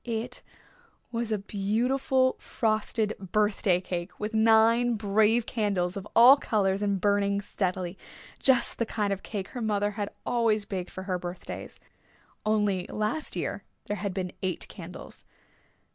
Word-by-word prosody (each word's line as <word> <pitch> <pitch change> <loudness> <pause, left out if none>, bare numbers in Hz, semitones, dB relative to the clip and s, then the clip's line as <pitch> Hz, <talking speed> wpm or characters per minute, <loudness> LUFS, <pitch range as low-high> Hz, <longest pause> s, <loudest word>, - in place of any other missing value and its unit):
It 230 0 -3 0.7
was 230 -1 -2
a 215 - +2
beautiful 245 +6 +1
frosted 220 -1 0
birthday 195 -1 +1
cake 175 -1 -5
with 210 +2 -3
nine 225 +2 +4
brave 215 +2 +2
candles 200 -7 -1
of 200 0 -6
all 250 +4 +9
colors 200 -6 0
and 200 -2 +1
burning 200 0 +2
steadily, 185 -2 -3 0.4
just 260 -3 +2
the 230 - +2
kind 205 -3 0
of 195 - -6
cake 200 -3 -5
her 250 - -6
mother 205 -2 +1
had 205 0 -3 0.2
always 225 -3 +1
baked 185 -3 -4
for 185 - -7
her 185 -2 -2
birthdays. 175 0 -7 0.7
Only 205 -3 +1
last 215 +9 -2
year - - -3 0.2
there 205 - -3
had 200 -1 -2
been 185 -2 -2
eight 185 -2 -2
candles. - - -10
210 Hz, 145 wpm, -28 LUFS, 195-225 Hz, 0.7 s, all